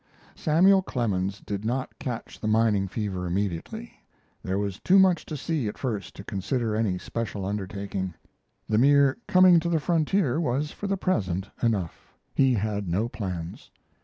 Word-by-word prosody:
Samuel 190 +5 +4
Clemens 100 - -2
did 100 0 -4
not 125 +4 -3
catch 125 -5 -5
the 110 - -3
mining 110 -3 +3
fever 95 -3 -3
immediately; 85 -8 -4 0.4
there 95 +1 -2
was 100 -1 -2
too 190 - +4
much 190 -3 +4
to 155 - -4
see 145 -4 -1
at 105 - -5
first 105 -7 -4
to - - -9
consider 110 +3 -2
any 105 -4 0
special 105 -1 -4
undertaking. 100 -2 -4 0.5
The 110 0 +2
mere 140 - +4
coming 185 -2 +7
to 170 +1 -2
the 165 -2 +2
frontier 160 -2 +1
was 145 +1 -1
for 205 - -6
the 195 0 0
present 95 - -1
enough; 100 -8 -2 0.2
he 135 -2 +3
had 105 -2 -2
no 100 +7 0
plans. 90 -7 -6
110 Hz, 160 wpm, -26 LUFS, 100-145 Hz, 0.5 s, coming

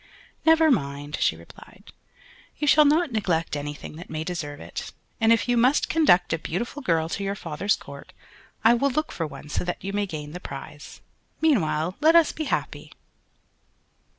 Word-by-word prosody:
"Never 320 -1 +6
mind," 145 - -2
she - - +2
replied, 85 +1 -16 0.6
"you 300 - -2
shall 300 +1 +6
not 305 +1 +3
neglect 175 -8 -1
anything 145 +1 -6
that 175 - -10
may 155 0 -3
deserve 155 -4 -5
it; - - -7 0.3
and 225 -1 +4
if 230 - +3
you 245 - +2
must 250 +5 +3
conduct 190 - +4
a 165 - -1
beautiful 235 - -4
girl 165 - +1
to 200 - -3
your 195 0 -2
father's 190 +3 -1
court, - - -12 0.5
I 225 +2 +7
will 275 +4 +2
look 310 +4 -2
for 165 - -3
one 150 - -11
so 150 - -2
that 175 0 -4
you 195 +1 -4
may 205 0 0
gain 150 -4 -6
the 180 - -7
prize. 145 0 -9 0.4
Meanwhile 175 - +1
let 320 +2 +5
us 335 -3 +6
be 310 - -4
happy." - - -3
185 Hz, 180 wpm, -25 LUFS, -, 0.6 s, I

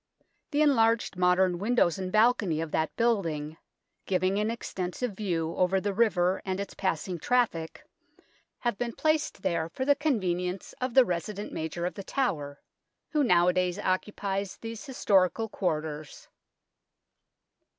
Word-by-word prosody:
The 295 0 +2
enlarged 230 -8 +3
modern 180 0 +3
windows 200 -4 +2
and 185 -1 -3
balcony 215 -7 +3
of 165 -1 -3
that 160 0 -1
building, 165 -10 0 0.5
giving 190 +1 +1
an 210 +1 0
extensive 225 0 -3
view 175 -5 -2
over 185 +1 +2
the 200 +1 -2
river 190 -4 +2
and 190 0 -3
its 200 - -5
passing 180 -1 -2
traffic, 215 -8 0 0.8
have 240 -5 -1
been 240 -1 -2
placed 310 -9 0
there 165 -1 0
for 260 - -4
the 285 - +6
convenience 185 - -1
of 255 -2 -2
the 260 -2 +8
resident 195 +3 -4
Major 160 +2 -3
of 180 - -2
The 200 - -7
Tower, 150 - -2 0.5
who 300 -2 +2
nowadays 180 -3 +3
occupies 195 0 -2
these 225 -1 -7
historical 220 -5 +2
quarters. 155 -6 -3
190 Hz, 135 wpm, -28 LUFS, 175-230 Hz, 0.8 s, the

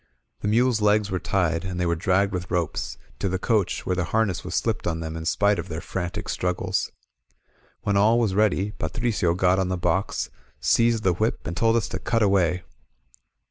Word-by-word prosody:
The - - -3
mules' 115 +1 +3
legs 105 -1 +3
were 95 - 0
tied, 85 -4 0
and 90 -1 -4
they 90 - +1
were 85 0 +1
dragged 95 +4 +1
with 90 0 -4
ropes; 85 -3 -2 0.2
to 100 - 0
the 95 - -1
coach, 105 0 0
where 90 - 0
the 90 -1 0
harness 110 -4 0
was - - -4
slipped - - -1
on 80 -1 -1
them 80 0 -5
in 80 0 -5
spite 100 +1 +2
of 85 - -5
their 80 0 -4
frantic 90 -1 -4
struggles. 90 0 -1 0.9
When 100 - +1
all 105 +4 +4
was 115 -5 +1
ready, 105 -1 +2
Patricio 105 -7 -1
got 90 +1 +3
on 95 - +1
the 95 0 -1
box, 95 +2 -1 0.3
seized 115 -1 +3
the 95 - +3
whip, 110 +7 -1
and 85 - -4
told 115 +3 +3
us 115 - +1
to - - -4
cut 115 -2 +1
away. 90 -3 +2
95 Hz, 200 wpm, -25 LUFS, 90-105 Hz, 0.9 s, all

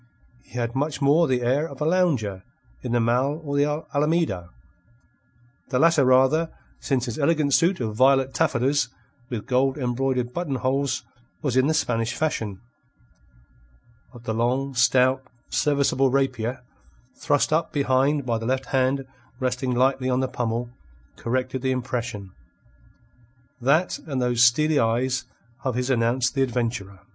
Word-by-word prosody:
He - - -11
had 120 -1 -2
much 145 +3 -2
more 150 +4 +4
the 125 -2 0
air 140 +7 +1
of 140 - -11
a 150 - -1
lounger 145 - +1 0.4
in 125 - -5
the 120 - +2
Mall 125 +6 +1
or 140 -2 -3
the 150 +2 +1
Alameda 150 - 0 1.2
the 130 - 0
latter 165 +1 +4
rather, 130 +6 +4 0.3
since 130 -3 -1
his 120 0 -5
elegant 150 -1 +2
suit 175 +6 +3
of 110 -3 -3
violet 135 +1 +4
taffetas 135 -3 +1 0.4
with 115 -4 -4
gold 130 +2 +1
embroidered 125 -1 -1
button 170 -6 -2
holes 130 -1 -1 0.4
was 135 -5 -1
in 130 +1 +4
the 155 - +1
Spanish 115 -3 0
fashion. 110 -11 -2 1.5
But 120 -2 -14
the 110 - -2
long, 125 +4 0
stout, 130 +1 +3 0.3
serviceable 140 -2 +2
rapier, 130 -2 -1 0.5
thrust 145 +1 +1
up 165 +1 +1
behind 140 0 +1
by 115 -2 0
the 115 - -5
left 130 +1 0
hand 135 +1 +1 0.3
resting 125 -1 -1
lightly 130 +1 +2
on 125 0 +1
the 130 - 0
pummel, 120 0 -3 0.4
corrected 130 +2 -2
the 130 - -1
impression. 120 -6 -3 1.3
That 155 +8 +2
and 135 -4 -2
those 125 -1 +1
steely 145 +5 +4
eyes 125 +3 0 0.4
of 130 -3 -1
his 125 +1 -1
announced 120 +1 +1
the 135 - 0
adventurer. 115 -7 -2
130 Hz, 145 wpm, -24 LUFS, 120-140 Hz, 1.5 s, more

